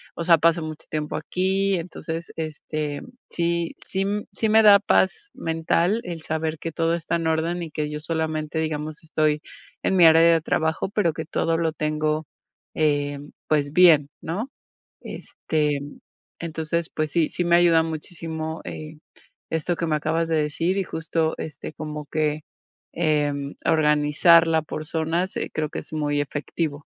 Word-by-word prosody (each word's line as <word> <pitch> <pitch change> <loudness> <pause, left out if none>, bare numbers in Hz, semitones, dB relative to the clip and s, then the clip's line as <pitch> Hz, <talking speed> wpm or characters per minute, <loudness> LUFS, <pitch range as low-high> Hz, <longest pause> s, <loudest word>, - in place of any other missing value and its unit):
o 170 - -3
sea, 165 -1 +6
paso 165 +2 +3
mucho 155 -1 -7
tiempo 150 -1 -3
aquí, 190 +1 0
entonces, 165 -1 -6
este, 155 -2 -4 0.3
sí 170 0 -1
sí 190 - -3
m 205 +2 -1
sí 220 - 0
me 220 +1 +6
da 205 -1 +9
paz 205 - +1
mental 165 +6 0
el 170 -3 -6
saber 160 0 -2
que 165 - -4
todo 165 +1 0
está 170 0 -1
en 165 -1 -2
orden 165 +2 0
y 160 - -7
que 150 0 -2
yo 150 0 -4
solamente, 160 0 -2
digamos, 155 0 -3
estoy 155 -1 +1 0.4
en 190 - +2
mi 170 - +7
área 160 0 +8
de 165 -1 +5
trabajo, 160 +2 0
pero 195 -5 +1
que 160 +2 -5
todo 165 +1 0
lo 165 -1 +1
tengo, 155 0 -1 0.5
eh, 145 -2 +1 0.3
pues, 145 -1 +1
bien, 160 -6 +6
¿no?, 210 +11 -4 0.5
este, 150 -2 -2 0.6
entonces, 165 0 -2
pues 155 -2 -2
sí, 165 -3 +2
sí 175 - -2
me 170 0 +4
ayuda 165 -2 +5
muchísimo, 160 0 -5
eh, 155 0 -7 0.5
esto 160 +2 0
que 170 - -2
me 155 - +1
acabas 160 +2 0
de 160 - +2
decir 165 +5 0
y 195 - +1
justo, 160 0 -1
este, 150 0 -6
como 150 -1 -6
que, 155 -1 0 0.5
em, 145 -3 0
organizarla 160 +2 +4
por 155 0 -6
zonas, 165 +3 -1 0.2
creo 155 -1 -1
que - - -5
es - - -9
muy 145 -1 0
efectivo. 145 +1 -4
160 Hz, 160 wpm, -24 LUFS, 155-170 Hz, 0.6 s, da